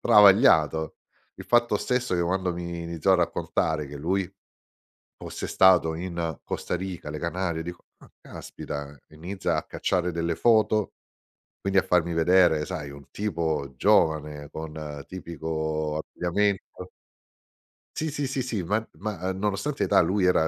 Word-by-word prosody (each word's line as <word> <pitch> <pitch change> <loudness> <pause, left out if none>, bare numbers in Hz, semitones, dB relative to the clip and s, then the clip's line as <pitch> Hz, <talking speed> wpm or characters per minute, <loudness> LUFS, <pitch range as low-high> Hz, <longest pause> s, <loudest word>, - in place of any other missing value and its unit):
travagliato. 100 - +5 0.4
Il - - -10
fatto 120 -3 +3
stesso, 125 -2 -1
che 85 - +1
quando 90 +1 0
mi 85 0 -5
iniziò 85 +3 +1
a - - +6
raccontare, 80 -3 0
che 70 - -8
lui 90 +5 -1 0.9
fosse - - -6
stato 90 -4 +5
in 85 -3 -4
Costa - - -3
Rica, 90 -4 -5
le 75 - -5
Canarie, 85 -1 -2
dico: 85 +1 -8
"Ah, - - -18
caspita!" 70 0 -7
Inizia 85 +6 -3
a - - -2
cacciare 90 -1 -1
delle 85 0 -1
foto, 110 -2 +3 0.7
quindi 100 0 +1
a - - +5
farmi 85 -1 +1
vedere, 85 -2 +4
sai, 80 -6 -5
un 70 0 -13
tipo 80 -9 -2
giovane 75 0 +2
con 75 -3 -7
tipico 80 -3 -3
abbigliamento 90 +2 -2 1.1
Sì, 160 0 -1
sì, 145 -1 -2
sì, 135 0 -2
sì, 115 -7 -2
ma 105 +5 -1
ma, 95 -3 -3
uhm, 95 - -3
nonostante 105 +8 -1
età 100 - +4
lui 95 +3 +1
era 85 -3 +4
85 Hz, 145 wpm, -26 LUFS, 80-95 Hz, 1.1 s, a